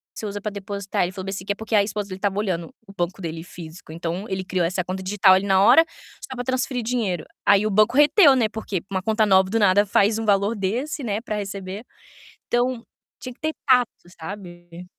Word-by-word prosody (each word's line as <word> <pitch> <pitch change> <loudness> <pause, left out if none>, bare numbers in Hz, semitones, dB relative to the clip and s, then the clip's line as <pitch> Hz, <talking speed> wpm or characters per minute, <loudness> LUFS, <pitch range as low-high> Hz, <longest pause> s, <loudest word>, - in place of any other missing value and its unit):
você - - -6
usa 205 0 -5
pra 210 - -3
depositar?" 200 -1 -3
Ele 175 - -2
falou 190 -1 -7
bem 195 - -4
assim, 190 -1 -6
que 200 - -1
é 200 - -1
porque 220 +1 -3
a 205 - +5
esposa 205 0 -4
dele 185 - -6
estava 200 0 -1
olhando 175 -6 -3
o 195 - -13
banco 175 +2 -2
dele 165 -1 -5
físico, 165 -2 -11
então, 170 +4 -4
ele 190 -1 -2
criou 185 -2 -1
essa 180 +2 -1
conta 185 +1 -5
digital 190 0 +4
ali 190 +1 0
na 190 -1 +3
hora 325 +10 +7 0.4
só 260 - -8
pra 245 - -4
transferir 255 0 -1
dinheiro. 220 -8 -1 0.2
Aí 205 +1 +4
o - - -1
banco 215 +4 +3
reteu, 295 +1 +6
né, 230 -4 +2
porque 210 -4 -4
uma 190 -1 -2
conta 220 +1 +2
nova, 190 -1 +5
do 225 +3 0
nada, 205 0 +4
faz 205 +2 +2
um 225 - -3
valor 205 +1 +2
desse, 240 +10 -3
né, 215 -2 -2
pra 220 -2 -4
receber. 200 +1 -6 0.6
Então, 240 0 0 0.4
tinha 255 - -7
que - - -34
ter 315 0 -2
tato, 250 -3 +4 0.3
sabe? 175 -1 -9
200 Hz, 230 wpm, -23 LUFS, 185-220 Hz, 0.6 s, hora